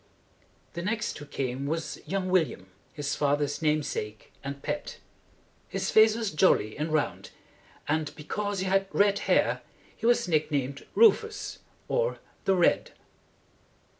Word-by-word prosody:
The 170 - -4
next 215 +1 -2
who 145 - -10
came 135 -1 -3
was 160 +2 -3
young 190 -1 -1
William, 160 - 0 0.2
his 145 -1 -3
father's 145 0 0
name 155 -1 +2
sake 105 -5 -5
and 140 0 -6
pet. 295 - -4 0.7
His - - -2
face 220 0 +6
was 225 -3 -2
jolly 155 - +3
and 155 +2 -3
round, 155 -2 -1 0.6
and 155 0 0
because 205 +5 -3
he - - -1
had 195 +1 +2
red 200 0 +3
hair - - +3 0.3
he 230 - -2
was 240 -6 +3
nicknamed 145 -4 -1
Rufus, 415 - +3 0.3
or - - 0 0.3
the 195 - +4
Red. 175 - +2
160 Hz, 135 wpm, -28 LUFS, 145-200 Hz, 0.7 s, face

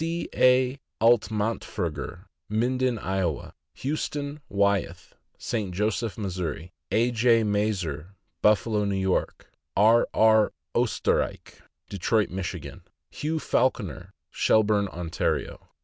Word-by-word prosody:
A. 130 -6 +2 0.2
Altmantferger, 105 -7 0 0.2
Minden, 125 +3 +1
Iowa; 95 -7 -2 0.2
Huston 145 0 -3
Wyeth, 100 -4 0 0.2
St. 105 -6 -3
Joseph, 110 +2 -1
Mo.; 100 -4 -3 0.6
A. 120 +2 +2
J. 115 0 +4
Maerz, 105 -2 0 0.6
Buffalo, 105 0 +3
N. 95 -2 0
Y.; 95 - +3 0.5
R. 110 +4 +5
R. 110 -1 +4 0.2
Oesterrich, - - -1 0.3
Detroit, 105 +3 0
Mich.; 95 0 -3 0.6
Hugh 155 +2 -2
Falconer, 120 - -1 0.2
Shelburne, 105 -2 +3
Ontario. 85 -2 -3
110 Hz, 90 wpm, -26 LUFS, 100-120 Hz, 0.6 s, R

